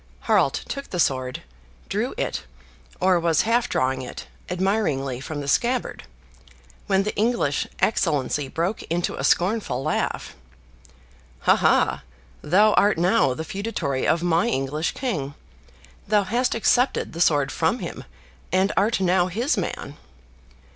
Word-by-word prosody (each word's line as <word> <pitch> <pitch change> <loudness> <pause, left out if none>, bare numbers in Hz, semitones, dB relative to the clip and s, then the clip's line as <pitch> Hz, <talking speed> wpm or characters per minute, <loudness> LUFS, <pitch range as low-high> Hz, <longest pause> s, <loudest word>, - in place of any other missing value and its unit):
Harald - - +2
took 275 0 -6
the 180 - -4
sword, 130 -4 0 0.4
drew - - -2
it, - - -3 0.5
or 185 -1 +3
was 165 -2 +2
half 235 +2 +1
drawing 130 0 0
it, 125 - -8 0.2
admiringly 175 - 0
from 145 +2 -5
the 140 - -6
scabbard, 245 - 0 0.8
when 195 -1 +2
the 210 - -3
English 215 - 0
excellency 145 - +1
broke 170 +9 -2
into 170 +1 -1
a - - -5
scornful 180 - +1
laugh, 155 - -2 1.1
"Ha, - - +5
ha; - - +2 0.4
thou 205 +7 +4
art 205 -3 +3
now 175 - +3
the 160 - -5
feudatory 195 -11 -2
of 165 +2 +2
my 175 +5 +2
English 145 - -1
king; 150 - -3 0.7
thou 210 -1 +3
hast 240 +6 0
accepted 245 +3 +1
the 165 - -4
sword 145 -5 +3
from - - +1
him, - - -7 0.5
and 190 +2 +2
art 210 0 +2
now 180 -1 +3
his 235 - 0
man!" 160 -7 -4
175 Hz, 135 wpm, -23 LUFS, 145-215 Hz, 1.1 s, Ha